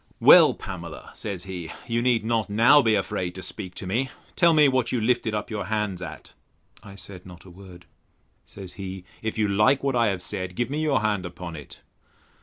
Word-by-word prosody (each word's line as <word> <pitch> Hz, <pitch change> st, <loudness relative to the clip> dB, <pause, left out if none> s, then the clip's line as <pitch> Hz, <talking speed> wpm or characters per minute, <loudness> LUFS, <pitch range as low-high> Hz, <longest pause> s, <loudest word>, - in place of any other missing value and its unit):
Well, -, -, +8 dB
Pamela, -, -, -8 dB
said 100 Hz, -5 st, -6 dB
he, 90 Hz, -4 st, -7 dB
you 115 Hz, -1 st, -1 dB
need 120 Hz, -3 st, +1 dB
not 115 Hz, -3 st, 0 dB
now 115 Hz, +8 st, +6 dB
be 110 Hz, -4 st, +3 dB
afraid 90 Hz, -2 st, -2 dB
to 95 Hz, -, -7 dB
speak 95 Hz, -4 st, -6 dB
to -, -, -6 dB
me; 120 Hz, +8 st, -1 dB, 0.3 s
tell 170 Hz, -2 st, +5 dB
me 155 Hz, -2 st, +6 dB
what 130 Hz, -3 st, +1 dB
you 125 Hz, -, 0 dB
lifted 115 Hz, -1 st, 0 dB
up 105 Hz, -, -4 dB
your 105 Hz, -3 st, -3 dB
hands 105 Hz, -3 st, -2 dB
at? 90 Hz, -, -9 dB, 0.5 s
I 100 Hz, -2 st, -12 dB
said 95 Hz, -2 st, -10 dB
not 90 Hz, -1 st, -13 dB
a 95 Hz, -, -13 dB
word. 90 Hz, -1 st, -14 dB, 0.6 s
Says 95 Hz, -3 st, -10 dB
he, 95 Hz, -1 st, -6 dB, 0.2 s
If 110 Hz, 0 st, -3 dB
you 110 Hz, -1 st, +2 dB
like 105 Hz, +8 st, +3 dB
what 135 Hz, -2 st, 0 dB
I 120 Hz, -1 st, +3 dB
have 95 Hz, -3 st, -2 dB
said, 90 Hz, 0 st, -4 dB
give 120 Hz, +5 st, -2 dB
me 150 Hz, +2 st, -1 dB
your 145 Hz, -5 st, +1 dB
hand 105 Hz, -3 st, 0 dB
upon 85 Hz, -1 st, -7 dB
it. 75 Hz, -2 st, -12 dB
105 Hz, 210 wpm, -25 LUFS, 95-120 Hz, 0.6 s, Well